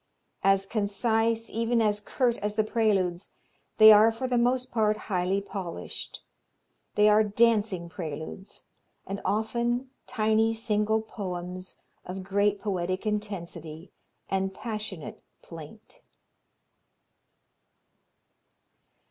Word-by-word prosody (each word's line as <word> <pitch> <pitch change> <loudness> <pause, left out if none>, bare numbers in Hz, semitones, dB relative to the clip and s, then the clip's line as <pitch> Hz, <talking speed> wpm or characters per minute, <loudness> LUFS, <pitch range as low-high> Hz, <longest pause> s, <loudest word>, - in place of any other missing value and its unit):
As 195 0 +4
concise, 225 +2 0
even 230 +1 +1
as 210 -2 +1
curt 240 +2 0
as 210 +1 -3
the 215 - +3
Preludes, 200 -5 0 0.5
they 220 0 +10
are 215 +2 +7
for 230 +3 -4
the 245 -1 +1
most 250 +1 +1
part 215 -2 +2
highly 190 0 -1
polished. 190 -4 -6 0.7
They 210 0 +5
are 210 +1 +6
dancing 210 -4 +2
preludes, 165 +3 -7 0.4
and 195 +1 -5
often 240 +4 -1 0.2
tiny 220 -1 +2
single 220 -1 +1
poems 185 -3 -6 0.3
of 185 +1 -6
great 200 +1 +1
poetic 185 -1 -2
intensity 175 -6 -4 0.4
and 190 0 -1
passionate 215 -8 -6 0.2
plaint. 165 +6 -12
210 Hz, 100 wpm, -27 LUFS, 190-225 Hz, 0.7 s, they